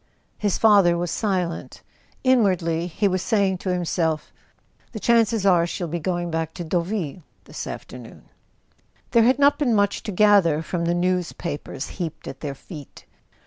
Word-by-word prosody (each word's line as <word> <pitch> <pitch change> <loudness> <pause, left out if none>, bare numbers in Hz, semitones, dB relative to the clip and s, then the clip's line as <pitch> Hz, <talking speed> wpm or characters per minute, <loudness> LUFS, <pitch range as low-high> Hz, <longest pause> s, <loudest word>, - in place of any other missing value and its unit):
His 205 -3 0
father 200 -6 +5
was 175 -1 -2
silent. 185 -6 -2 0.4
Inwardly 185 -10 +2
he 200 +4 0
was 185 -1 0
saying 195 -4 +1
to 190 - -4
himself: 165 -3 -1 0.6
"The 220 - -5
chances 225 -2 +2
are 175 -3 +4
she'll 175 0 -4
be 170 +2 -3
going 175 +1 -2
back 160 0 -3
to 175 - -5
Deau¬ 170 +1 0
ville 180 -3 -4 0.2
this - - -7
afternoon." - - -9 0.9
There 230 -2 +5
had 255 +1 +4
not 285 0 +4
been 250 -7 +2
much 205 -1 +1
to 210 - -5
gather 185 -6 +4
from 170 0 -3
the 170 +1 +1
news¬ 180 0 -1
papers 145 -4 -5
heaped 170 -4 -6
at 135 - -7
their 140 -3 -5
feet. 150 -1 -12
180 Hz, 165 wpm, -23 LUFS, 170-205 Hz, 0.9 s, father